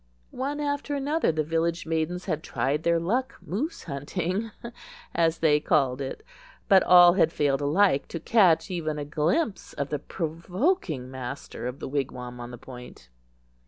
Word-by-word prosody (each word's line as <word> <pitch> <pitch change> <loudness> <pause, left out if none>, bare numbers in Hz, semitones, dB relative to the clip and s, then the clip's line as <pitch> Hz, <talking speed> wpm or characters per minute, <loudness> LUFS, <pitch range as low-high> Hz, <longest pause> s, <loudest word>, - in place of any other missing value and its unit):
One 280 +3 -3
after 285 0 -2
another 285 - +1
the 155 -1 -1
village 165 +2 -1
maidens 165 +2 -2
had 155 -5 -2
tried 145 0 -1
their 170 0 +2
luck 235 +10 -1
"Moose 285 - -4
hunting," 175 +8 -3 0.6
as 165 -1 +2
they 150 -2 +3
called 140 -4 +1
it; 135 - -5 0.4
but 195 -3 +7
all 175 -1 +8
had 170 -4 +3
failed 145 -3 +1
alike 145 0 +3
to 165 - -5
catch 190 -1 +3
even 155 -4 -2
a 145 - -4
glimpse 170 - -1
of 140 -1 -3
the 150 - -2
provoking 170 - -2
master 130 -1 -6
of 125 +2 -5
the - - -6
wigwam 125 -3 -4
on 120 0 -7
the 120 - -8
Point. 125 - -12
165 Hz, 160 wpm, -26 LUFS, 140-190 Hz, 0.6 s, all